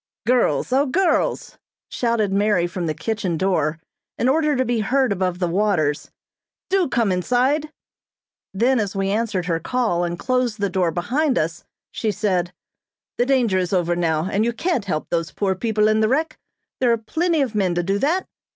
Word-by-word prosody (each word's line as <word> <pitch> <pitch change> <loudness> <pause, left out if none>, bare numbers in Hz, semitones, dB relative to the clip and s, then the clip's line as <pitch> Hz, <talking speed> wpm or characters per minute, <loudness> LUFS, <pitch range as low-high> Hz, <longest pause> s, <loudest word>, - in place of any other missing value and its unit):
"Girls, 250 +1 +1
O 280 +2 +3
girls!" 355 +6 0 0.3
shouted 230 -5 0
Mary 200 -3 +2
from 175 0 -4
the 155 - -2
kitchen 210 -7 -2
door 165 -4 0 0.4
in 240 - +1
order 300 +2 +2
to 260 0 +1
be 240 -2 0
heard 255 +3 +1
above 185 -2 -1
the 180 -1 0
waters, 170 -6 0 0.6
"Do 385 -2 +3
come 230 -5 +1
inside!" 255 - +1 0.8
Then, 240 +6 +2
as 205 -2 -2
we 195 0 0
answered 210 -4 -1
her 165 -1 0
call 220 -3 0
and 175 0 -2
closed 250 -1 -1
the 200 -2 -1
door 180 -2 +1
behind 255 - 0
us, 165 +2 -2 0.3
she 220 - -2
said: 185 -4 -1 0.7
"The 245 - +2
danger 240 -8 +2
is 180 0 -2
over 175 -2 +1
now, 165 -2 0
and 200 +2 0
you 235 +1 0
can't 260 - -1
help 155 -6 -2
those 165 -3 -1
poor 195 +5 0
people 215 +2 +1
in 215 0 +2
the 215 0 +2
wreck. 310 +6 -1 0.4
There 250 -2 +3
are 230 - +3
plenty 320 +8 0
of 245 -5 -4
men 190 -4 0
to 175 - 0
do 195 +3 0
that. 335 - +1
210 Hz, 185 wpm, -21 LUFS, 180-250 Hz, 0.8 s, O